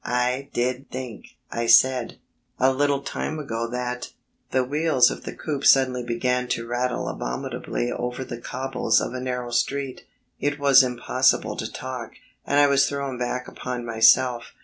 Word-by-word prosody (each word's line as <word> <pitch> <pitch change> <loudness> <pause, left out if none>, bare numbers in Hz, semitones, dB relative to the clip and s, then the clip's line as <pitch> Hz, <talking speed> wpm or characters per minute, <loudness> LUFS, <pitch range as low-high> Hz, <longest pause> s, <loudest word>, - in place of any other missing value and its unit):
"I 125 +2 -1
did 125 +2 -2
think," 125 -4 -8
I 115 0 -2
said, 130 0 +4 0.4
"a 130 +1 +3
little 140 0 +1
time 155 - -4
ago 115 -6 -3
that 125 0 -4 0.2
..." - - -47
The 130 -1 +2
wheels 145 -2 +3
of - - -8
the - - -4
coupe 145 -3 -4
suddenly 130 -2 +4
began 125 +1 -1
to 115 -1 -2
rattle 125 +1 -2
abominably 65 - -3
over 125 +2 -3
the 120 -2 -8
cobbles 130 +1 0
of - - -4
a 130 - -4
narrow 125 -1 -4
street. 135 +2 -2 0.3
It 145 +1 -1
was 140 -2 +6
impossible 130 +1 +1
to - - -5
talk, 125 -3 -6 0.3
and 140 - +3
I 145 - +7
was 140 -1 +3
thrown 140 -3 -4
back 125 +1 -3
upon 125 -1 -5
myself. 120 +1 +3
125 Hz, 165 wpm, -24 LUFS, 120-135 Hz, 0.4 s, I